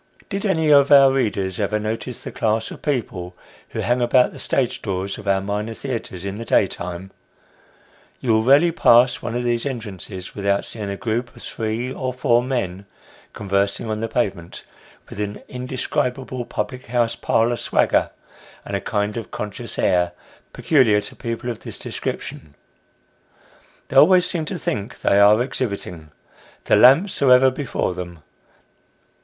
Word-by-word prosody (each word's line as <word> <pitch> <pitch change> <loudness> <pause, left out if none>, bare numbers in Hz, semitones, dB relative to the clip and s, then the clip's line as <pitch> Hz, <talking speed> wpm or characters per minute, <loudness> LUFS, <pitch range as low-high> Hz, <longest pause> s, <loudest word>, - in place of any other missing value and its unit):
Did 200 +1 -2
any 160 -5 +2
of 140 -1 +6
our 135 -1 +8
readers 105 -8 -1
ever 105 +1 0
notice 110 +3 -4
the - - -6
class 110 0 -1
of - - -10
people, 110 - -3 0.3
who 110 - -4
hang 120 +4 +1
about 125 +1 +4
the - - -11
stage 130 -3 -1
doors 95 -1 -3
of 100 - -11
our 95 -1 +2
minor 105 +3 -3
theatres 115 -9 -5
in 100 +2 -4
the - - -4
daytime. 95 -3 -1 1.1
You 125 - 0
will 110 - +3
rarely 145 +7 +5
pass 125 -6 +4
one 115 - -4
of 120 - -1
these 120 -1 0
entrances 105 -7 -6
without 100 0 0
seeing 105 -3 -5
a 100 - -4
group 120 +1 -3
of - - -12
three 115 +3 -3
or 130 -1 -3
four 120 -2 +2
men 100 -7 -3 0.5
conversing 100 +2 -1
on 110 - -2
the 115 - -2
pavement, 100 -7 -3 0.4
with - - -10
an 105 0 -4
indescribable 125 0 -3
public 120 +3 -5
house 120 -1 0
parlour 115 +2 +1
swagger, - - +1 0.6
and 100 - -4
a 100 - -2
kind 105 +1 -2
of 115 - -6
conscious 105 -1 -6
air, 90 -1 +2 0.4
peculiar 125 -9 +3
to 105 - -9
people 115 +1 -4
of 115 - -8
this - - -6
description. 75 -2 -6 1.3
They 135 - -1
always 180 +5 +7
seem 170 -3 -2
to 180 - -4
think 105 -9 -4
they 100 - +3
are 105 +2 +6
exhibiting; 100 - -4 0.6
the - - +4
lamps 160 +11 +5
are 135 -2 +5
ever 130 +1 +6
before 130 -8 -2
them. 85 -3 -8
115 Hz, 160 wpm, -21 LUFS, 100-130 Hz, 1.3 s, our